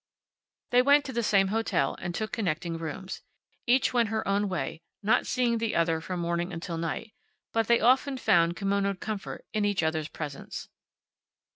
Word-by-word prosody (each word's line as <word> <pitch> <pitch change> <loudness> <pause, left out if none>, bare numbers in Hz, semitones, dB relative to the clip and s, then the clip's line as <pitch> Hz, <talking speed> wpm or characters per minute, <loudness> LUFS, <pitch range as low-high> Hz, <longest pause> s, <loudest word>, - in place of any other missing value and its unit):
They 245 0 +6
went 285 +2 +5
to 265 - -5
the 235 - 0
same 195 -3 +3
hotel, 215 -10 0
and 175 -2 -4
took 215 +3 -3
connecting 170 -4 -2
rooms. 175 +4 -5 0.5
Each 255 +2 +3
went 235 -3 +3
her 220 0 -2
own 200 +1 +1
way, 170 -2 -3 0.2
not 215 - +3
seeing 240 -2 +1
the 225 -1 -1
other 165 -1 +2
from 180 +2 -4
morning 170 +1 -1
until 165 0 -4
night, 170 +6 -4 0.4
but 225 -1 +1
they 235 0 +5
often 265 +2 +3
found 175 -8 +3
kimonoed 200 0 0
comfort 215 -3 -5
in 215 -1 +1
each 205 -4 +1
other's 160 -1 0
presence. 150 -4 -7
200 Hz, 170 wpm, -28 LUFS, 170-225 Hz, 0.5 s, They